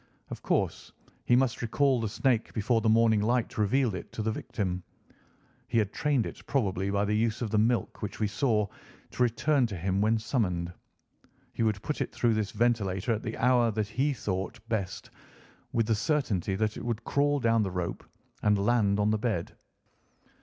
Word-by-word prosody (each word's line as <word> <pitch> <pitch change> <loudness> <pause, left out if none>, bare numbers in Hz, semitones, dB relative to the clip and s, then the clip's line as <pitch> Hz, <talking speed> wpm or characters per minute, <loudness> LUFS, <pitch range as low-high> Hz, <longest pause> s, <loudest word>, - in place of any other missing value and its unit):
Of - - -6
course - - -1 0.3
he 120 - +4
must 130 -1 +1
recall 130 +2 +2
the 110 - -1
snake 120 +1 0
before 115 +1 +1
the 110 - +2
morning 110 -1 +4
light 120 +2 0
revealed 115 +2 +2
it 90 - -7
to 110 - -3
the 110 - 0
victim. 95 -4 -3 0.9
He 120 - 0
had 105 -2 +1
trained 145 -7 +1
it, 85 - -8
probably 100 -8 0
by 100 +1 +1
the 105 +1 0
use 115 +2 0
of 110 - -3
the 110 - +3
milk 115 +2 0
which 105 -2 -5
we 110 - +2
saw, 105 0 +1 0.5
to - - -5
return 125 +3 +2
to 100 -4 -6
him 95 +3 0
when 110 +2 +3
summoned. 90 -7 -1 0.8
He - - -4
would 110 -3 +1
put 150 - -3
it - - -2
through 120 -2 +1
this 110 -2 -1
ventilator 110 -2 0
at 110 - -3
the 110 - -5
hour 120 -1 +4
that 105 -1 -2
he 140 +5 +1
thought 95 -8 -3
best, 100 -5 -3 0.6
with 115 -1 +1
the 115 - +2
certainty 105 - 0
that 110 +1 -1
it - - -6
would 115 -2 -3
crawl 145 0 +1
down 115 -2 +3
the 100 - 0
rope 90 -2 -4 0.4
and 105 -1 +3
land 100 -1 +2
on 105 +1 +2
the 110 - +1
bed. 105 -7 -2
110 Hz, 190 wpm, -29 LUFS, 100-120 Hz, 0.9 s, he